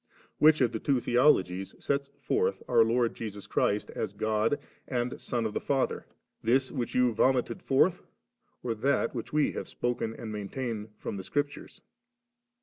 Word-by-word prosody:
lo. - - -27 0.2
Which 155 -1 +6
of 120 -3 +3
the 110 - -3
two 135 +1 +2
theologies 95 -8 +2
sets 140 0 -1
forth 460 +4 0
our 120 -2 +5
Lord 115 +1 +2
Jesus 105 -3 -7
Christ 105 +1 0
as 105 -3 -3
God 110 +5 +1 0.3
and 125 -1 -2
Son 120 -2 -1
of 110 - -2
die - - -1
Father, 135 -2 -1 0.3
this 130 +3 +2
which 125 -5 -3
you 125 -2 +4
vomited 125 0 +2
forth, 165 +7 +3 0.6
or 120 - 0
that 135 +6 +1
which 120 -3 -5
we 150 -1 +2
have - - -5
spoken 120 -2 -2
and 110 - -6
maintain 105 +1 -4
fi - - -4
om - - -5
the 95 - -5
Scriptures 145 +6 -3
120 Hz, 170 wpm, -29 LUFS, 110-135 Hz, 0.6 s, Which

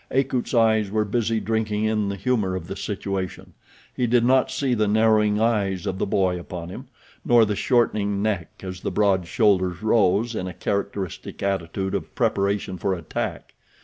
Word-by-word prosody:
Akut's 130 -1 0
eyes 110 -3 +3
were 105 +1 0
busy 115 +1 0
drinking 110 -1 -1
in 110 -2 +1
the 100 - -3
humor 100 -2 0
of 90 -3 -5
the 95 - -6
situation—he 100 +4 -5
did 120 0 +3
not 130 +1 +4
see 130 0 0
the 110 -3 +1
narrowing 105 -1 +3
eyes 100 -5 0
of 95 -1 -3
the - - 0
boy 95 -2 +1
upon 85 -1 -7
him, 125 +8 -9 0.4
nor 120 -2 +5
the 105 -1 -1
shortening 105 -4 +1
neck 100 -5 -1
as 95 -1 -6
the - - -3
broad 95 -4 +1
shoulders 95 -3 +1
rose 110 +1 +2
in 95 -4 -3
a 90 - -6
characteristic 100 -3 -4
attitude 95 0 -2
of - - -4
preparation 100 -2 0
for 95 +2 0
attack. 85 -3 -5
105 Hz, 170 wpm, -24 LUFS, 95-110 Hz, 0.4 s, nor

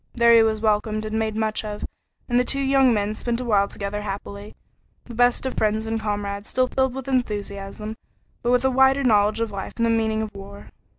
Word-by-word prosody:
There 235 -1 +5
he 230 - +7
was 220 -1 +1
welcomed 215 0 0
and 215 +1 -2
made 220 -1 -1
much 220 0 -1
of, 210 -1 -5 0.4
and 245 0 +2
the - - +3
two 275 +2 -1
young 270 -1 +4
men 210 -1 0
spent 235 +2 -3
a 250 - -4
while 200 -4 +3
together 205 +1 -5
happily, 200 0 -7 0.5
the 240 - -10
best 245 +2 +2
of 260 - -2
friends 215 +1 0
and 225 0 -2
comrades, 205 -1 -4
still 255 0 +2
filled 265 0 0
with 270 -1 -6
enthusiasm, 210 -4 -3 0.5
but 240 - -1
with 250 +1 +3
a 265 - +3
wider 265 +2 +4
knowledge 215 -2 +3
of 225 -2 -1
life 195 -1 -6
and 230 - +1
the 230 - +2
meaning 220 -1 +1
of 215 - -7
war. 200 +1 -11
220 Hz, 220 wpm, -23 LUFS, 210-245 Hz, 0.5 s, he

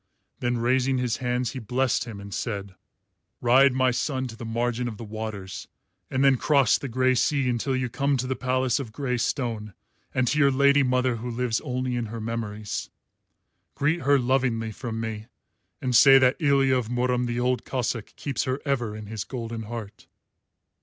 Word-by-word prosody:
Then 120 0 0
raising 130 +2 +2
his 125 -2 0
hands 125 -1 -1
he 135 - -6
blessed 125 +2 0
him 110 -4 -8
and 100 0 -9
said: 100 -2 -4 0.7
"Ride, 130 +3 +5
my 130 0 +3
son, 130 +2 -1
to 115 - -9
the 115 - -8
margin 120 +1 -1
of 110 -3 -6
the 115 - -8
waters, 105 -3 -6 0.4
and 130 0 0
then 135 -1 +5
cross 140 -3 +3
the 140 - -5
grey 130 +1 +2
sea 135 +2 +1
until 125 +2 0
you 130 -1 0
come 140 +3 0
to 125 - -2
the 130 +1 -1
palace 130 +1 0
of 125 -6 -6
grey 125 0 -2
stone 115 - -2 0.4
and 130 -1 +1
to 150 - +1
your 140 -2 +6
lady 140 +1 +4
mother 125 -2 +1
who 120 +2 -5
lives 120 -1 -1
only 125 0 -2
in 120 -2 -2
her 115 +2 -6
memories. 110 -2 -4 0.9
Greet 150 +4 +1
her 140 +1 +4
lovingly 125 -3 0
from 115 0 -5
me, 110 -1 -5 0.6
and 125 -2 0
say 135 +3 +9
that 130 0 +4
Ilya 135 -3 +3
of 120 -3 -2
Murom 125 0 0
the 120 0 -2
Old 125 -1 0
Cossáck 120 -4 -3
keeps 140 -5 -2
her 130 +2 -1
ever 120 -7 -1
in 110 0 -7
his 110 -1 -5
golden 115 -3 -5
heart." 110 -3 -8
125 Hz, 185 wpm, -26 LUFS, 115-130 Hz, 0.9 s, say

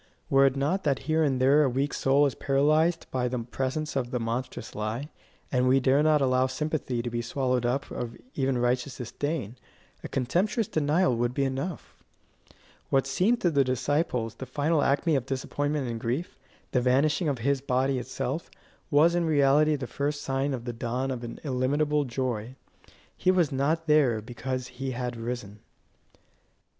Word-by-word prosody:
Were 135 0 +6
it 135 - 0
not 150 +8 0
that 140 -3 +2
here 160 +1 +2
and 135 -4 +1
there 135 +4 +5
a 140 - +3
weak 135 +3 -1
soul 140 +2 +3
is 140 - 0
paralysed 155 +5 +2
by 125 -1 0
the 125 +1 -2
presence 130 +6 -3
of 125 -3 -1
the 125 - -2
monstrous 115 +3 -4
lie, 110 +7 -3 0.4
and 125 -1 +2
we 130 +1 +5
dare 135 +2 +3
not 155 -1 +4
allow 130 -1 +3
sympathy 130 -3 -2
to 120 - -2
be 120 0 -1
swallowed 125 0 0
up 135 +3 -2
of 115 -1 -5 0.2
even 135 -2 0
righteous 125 +2 0
disdain, 130 -1 -4 0.5
a - - -4
contemptuous 185 - 0
denial 155 0 +2
would 120 +1 -1
be 140 - +1
enough. 135 +6 -4 0.9
What 135 0 +2
seemed 185 - +1
to 175 - +2
the 140 -2 +4
disciples 130 -2 0
the 130 +3 -8
final 145 +4 +1
acme 145 +3 +2
of 130 -2 -1
disappointment 145 +1 -2
and 115 -1 -4
grief, 125 +8 -3 0.3
the 125 - +2
vanishing 145 +6 +2
of 140 - -1
his 135 +3 0
body 130 0 +1
itself, 130 +5 -4 0.4
was 155 +4 +5
in 175 -1 +1
reality 150 0 +4
the 135 -3 -4
first 145 +3 -3
sign 135 +1 -1
of 120 -2 -8
the 120 - -3
dawn 125 +3 -2
of 125 -2 -4
an 115 - -7
illimitable 145 +2 +1
joy. 125 -2 -3 0.6
He - - 0
was 180 -5 +3
not 150 +5 0
there 145 -7 +4
because 125 +3 -4
he 130 +1 -5
had 125 -1 -3
risen. 115 -3 -5
135 Hz, 175 wpm, -27 LUFS, 125-150 Hz, 0.9 s, Were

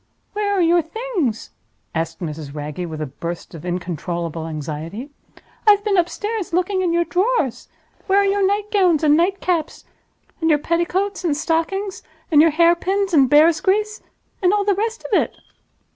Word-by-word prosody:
"Where 410 0 -1
are 390 - +2
your 340 +1 +4
Things?" 340 - -3 0.4
asked 165 +1 -3
Mrs. 155 -3 -6
Wragge, 150 +4 -5
with 155 -1 -6
a - - -1
burst 170 +6 -7
of 160 - -9
incontrollable 170 -2 -4
anxiety. 160 - -6 0.6
"I've 410 -1 +6
been 415 -2 +1
upstairs 375 +2 -1
looking 370 +2 +1
in 355 -2 +1
your 340 0 +2
drawers. 370 - 0 0.4
Where 390 0 +3
are 400 - +4
your 395 0 +1
night 405 +2 0
gowns 360 -7 +3
and 295 -1 +5
night 370 +4 +1
caps? 335 -4 -2 0.6
and 325 - +2
your 300 - +5
petticoats 360 +6 -1
and 305 -5 0
stockings? 355 +5 -1 0.3
and 300 -2 +7
your 330 - +6
hair 335 +2 +4
pins 385 +2 -1
and 275 -5 +5
bear's 310 +3 +5
grease, 425 +2 0 0.4
and 365 -1 +4
all 410 -1 +1
the 405 - +3
rest 445 +4 -3
of - - -5
it?" - - -5
340 Hz, 175 wpm, -20 LUFS, -, 0.6 s, and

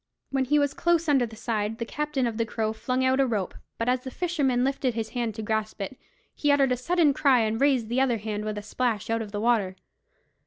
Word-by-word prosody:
When 270 -1 +1
he 295 +4 +3
was 285 -1 +2
close 335 -1 +1
under 270 -5 +3
the 220 - -11
side, 220 -1 -2
the 230 - -3
captain 295 0 -2
of 230 -2 -2
the 230 - +1
Crow 220 0 -1
flung 255 +3 -1
out 260 +1 +2
a 270 - +4
rope; 210 -6 -2 0.2
but 230 - -2
as 250 +1 +2
the 260 - -6
fisherman 275 -6 0
lifted 265 -2 0
his 225 -1 -3
hand 235 -4 -3
to 220 - -5
grasp 220 0 -2
it, 200 +6 -4 0.4
he 290 - +1
uttered 275 -2 +3
a - - +3
sudden 310 +3 +2
cry, 265 -3 +4
and 220 +2 -1
raised 265 -5 +3
the 245 +3 +1
other 250 -3 +2
hand 210 0 -4
with 215 -1 -3
a 205 - -5
splash 225 -1 -1
out 230 0 +1
of 210 -2 -6
the 205 - -3
water. 215 -5 +1
240 Hz, 245 wpm, -26 LUFS, 220-270 Hz, 0.4 s, a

